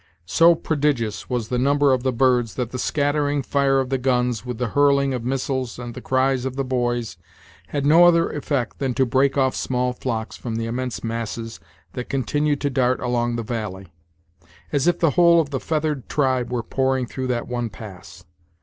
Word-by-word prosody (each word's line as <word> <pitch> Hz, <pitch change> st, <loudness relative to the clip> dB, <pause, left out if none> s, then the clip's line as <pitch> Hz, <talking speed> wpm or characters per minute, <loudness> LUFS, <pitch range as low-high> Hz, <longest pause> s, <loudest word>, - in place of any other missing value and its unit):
So 170 Hz, -, +5 dB
prodigious 145 Hz, -9 st, -1 dB
was 120 Hz, -3 st, -2 dB
the 125 Hz, -, 0 dB
number 140 Hz, +1 st, +3 dB
of 130 Hz, -, 0 dB
the 130 Hz, +1 st, 0 dB
birds 125 Hz, -2 st, +2 dB
that 125 Hz, -2 st, -3 dB
the 130 Hz, -, -5 dB
scattering 145 Hz, +1 st, 0 dB
fire 135 Hz, 0 st, +2 dB
of 130 Hz, -1 st, -2 dB
the 135 Hz, -, +1 dB
guns, 125 Hz, -3 st, 0 dB
with 125 Hz, -2 st, -5 dB
the 125 Hz, -1 st, -2 dB
hurling 140 Hz, +1 st, +3 dB
of 125 Hz, -2 st, -3 dB
missiles 130 Hz, 0 st, -2 dB
and 120 Hz, -1 st, -7 dB
the -, -, -8 dB
cries 130 Hz, -1 st, +1 dB
of 130 Hz, -1 st, -3 dB
the 135 Hz, -, -1 dB
boys, 120 Hz, -3 st, -2 dB, 0.5 s
had 140 Hz, -1 st, -2 dB
no 165 Hz, +4 st, +7 dB
other 170 Hz, -1 st, +5 dB
effect 140 Hz, -4 st, -2 dB
than 130 Hz, -3 st, -1 dB
to 130 Hz, -, +3 dB
break 135 Hz, +3 st, +2 dB
off 130 Hz, -1 st, +2 dB
small 125 Hz, -1 st, -1 dB
flocks 115 Hz, -3 st, -4 dB
from 115 Hz, -2 st, -5 dB
the 115 Hz, 0 st, -2 dB
immense 125 Hz, +1 st, -4 dB
masses 115 Hz, -2 st, -4 dB, 0.3 s
that 125 Hz, -, -6 dB
continued 145 Hz, +2 st, 0 dB
to 145 Hz, -, 0 dB
dart 125 Hz, 0 st, +1 dB
along 120 Hz, -1 st, -1 dB
the 115 Hz, -, -3 dB
valley, 105 Hz, -5 st, -5 dB, 0.8 s
as 145 Hz, +1 st, +1 dB
if 175 Hz, -1 st, +3 dB
the 165 Hz, -4 st, +2 dB
whole 170 Hz, +1 st, +5 dB
of 150 Hz, -3 st, -1 dB
the 135 Hz, -, -1 dB
feathered 150 Hz, -3 st, -2 dB
tribe 130 Hz, -4 st, 0 dB
were 120 Hz, -2 st, -1 dB
pouring 130 Hz, 0 st, 0 dB
through 130 Hz, +2 st, -5 dB
that 120 Hz, -2 st, -2 dB
one 120 Hz, -1 st, -2 dB
pass. 95 Hz, -4 st, -11 dB
130 Hz, 195 wpm, -22 LUFS, 120-140 Hz, 0.8 s, no